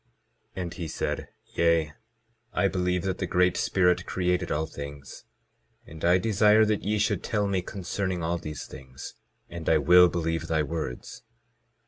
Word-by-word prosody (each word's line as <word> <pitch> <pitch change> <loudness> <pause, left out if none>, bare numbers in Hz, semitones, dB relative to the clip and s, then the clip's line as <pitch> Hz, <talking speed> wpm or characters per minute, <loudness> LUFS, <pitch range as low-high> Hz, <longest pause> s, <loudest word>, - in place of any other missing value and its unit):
22:11 - - -2
And 85 - -6
he 85 - -5
said: - - -3 0.2
Yea, 85 -2 +2 0.6
I 100 - +2
believe 90 -2 -1
that 95 -1 -2
the 95 - -2
Great 90 +1 +2
Spirit 90 -1 +1
created 90 -1 -1
all 80 +2 0
things, 70 -3 -9 0.6
and 80 0 -12
I 90 +2 +5
desire 105 +2 +4
that 105 -1 0
ye 105 +1 0
should 105 0 0
tell 105 -3 0
me 95 -2 0
concerning 95 -1 -3
all 85 +1 -1
these 75 -2 -7
things, 65 0 -10 0.3
and 85 -2 -5
I 80 - +5
will 90 +4 +6
believe 80 -1 -2
thy 80 -2 +1
words. 75 -4 -5
90 Hz, 160 wpm, -27 LUFS, 80-95 Hz, 0.6 s, will